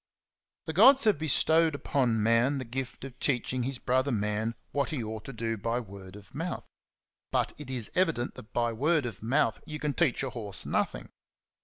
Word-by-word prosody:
The 160 - -4
gods 260 - +7
have 215 -9 +3
bestowed 160 +1 +3
upon 125 -6 +1
man 115 +5 +3
the 130 - -4
gift 125 +2 -5
of 130 -1 -11
teaching 130 -1 0
his 130 +1 -2
brother 130 +3 +1
man 105 +1 -1 0.2
what 140 -1 0
he 145 -7 -2
ought 110 0 -6
to - - -6
do 115 -2 -3
by 115 +3 -1
word 100 -4 -10
of 100 -2 -14
mouth; 165 +6 -3 0.7
but - - +1
it 150 -3 -8
is 125 -4 -3
evident 165 -9 +1
that 120 -3 -11
by 120 -1 0
word 150 +4 +2
of 120 - -6
mouth 115 0 +1
you 155 -1 -5
can 150 -1 -2
teach 140 -6 +1
a 135 - -3
horse 105 -6 -3
nothing. - - -1
125 Hz, 190 wpm, -29 LUFS, 115-145 Hz, 0.7 s, gods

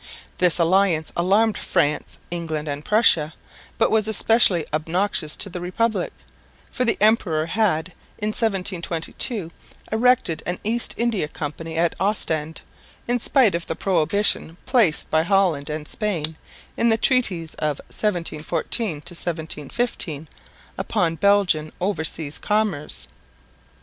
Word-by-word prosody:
This 180 -2 +4
alliance 170 -2 +2
alarmed 205 +5 +2
France, 145 +1 -1
England 160 -3 -3
and 145 0 -4
Prussia, 170 -8 +3 0.4
but - - +2
was 215 -1 +2
especially 215 -6 +4
obnoxious 160 0 0
to - - -1
the 180 -2 -6
Republic, 190 +2 -1 0.6
for 250 - 0
the 230 - +2
emperor 200 -8 +2
had 180 -3 0 0.3
in 210 - -2
1722 190 -2 0 0.4
erected 225 -7 +2
an 175 0 -2
East 230 +3 0
India 230 -9 0
Company 160 +2 -6
at 170 0 +2
Ostend 160 -6 -1 0.4
in 245 +1 +1
spite 240 -4 +4
of 170 0 -3
the 165 - -3
prohibition 185 -1 +1
placed 230 - +2
by 155 - +4
Holland 170 -5 +1
and 150 0 -5
Spain 165 -8 -1 0.4
in 235 - +2
the 225 - +3
treaties 200 - +1
of 150 -2 -1 0.2
1714 165 - -2
15 165 -11 -2 0.5
upon 180 -7 0
Belgian 180 -5 +2
overseas 160 -5 -2
commerce. 210 -8 -1
175 Hz, 120 wpm, -22 LUFS, 160-215 Hz, 0.6 s, This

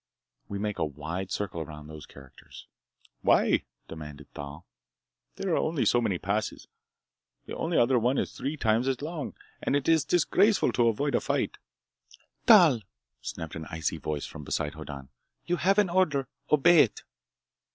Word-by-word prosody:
We 100 - -3
make 105 0 -3
a - - +2
wide 80 +6 -4
circle 90 -4 -3
around 75 -1 -8
those 75 -1 -10
characters!" 70 -2 -14 0.6
"Why?" - - +3 0.2
demanded 75 -3 -10
Thal. 70 +3 -8 0.7
"There 190 -3 -2
are - - +3
only 155 -3 0
so 120 - +4
many 100 -6 0
passes. 105 +4 -2 0.8
The - - -6
only 165 +1 -1
other 125 +1 +4
one 125 +4 +1
is - - -1
three 145 +3 -4
times 115 0 +2
as 135 +1 -1
long. 155 -2 -5 0.3
And - - 0
it 145 -1 0
is 165 -2 +4
disgraceful 185 +6 +3
to 120 -1 +3
avoid 140 +6 0
a - - +2
fight—" - - -1 0.9
"Thal!" 175 - +7 0.4
snapped 80 -2 -6
an 80 -2 -6
icy 80 -2 -2
voice 75 -2 -3
from 75 - -9
beside 75 +1 -2
Hoddan, 70 -4 -8 0.4
"you 175 - 0
have 195 +3 +2
an 200 -4 +3
order! 150 -8 +2 0.2
Obey 165 +3 +6
it!" - - +3
115 Hz, 160 wpm, -28 LUFS, -, 0.9 s, Thal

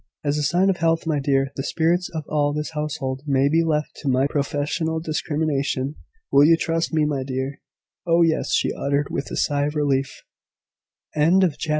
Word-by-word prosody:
"As 145 0 0
a - - 0
sign 180 +6 +3
of 185 - -3
health, 165 0 +1
my 155 -3 0
dear, 135 -1 +1
the - - -3
spirits 170 +5 0
of 160 -2 -5
all 145 -1 +1
this 150 +1 -3
household 150 -4 -3
may 135 -1 +3
be 165 +3 +3
left 150 -2 -1
to 140 - -3
my 130 +1 +3
professional 145 +3 -1
discrimination. 150 -3 -1 0.4
Will 140 - +6
you 165 +2 +6
trust 165 0 -1
me, 155 -2 +2
my 145 -3 -1
dear?" 130 +1 -4 0.5
"Oh, 170 0 +4
yes!" 160 -1 +1
she - - +1
uttered, 140 +1 -1
with 140 - -3
a - - -5
sigh 145 0 +1
of 150 - -5
relief. 135 -2 -1 0.9
CHAPTER 155 - -5
EIGHTEEN. 150 - +5
GRANDMAMMA 180 - +4
IN 185 - +4
RETREAT. 150 +2 -7
150 Hz, 205 wpm, -23 LUFS, 140-160 Hz, 0.9 s, Will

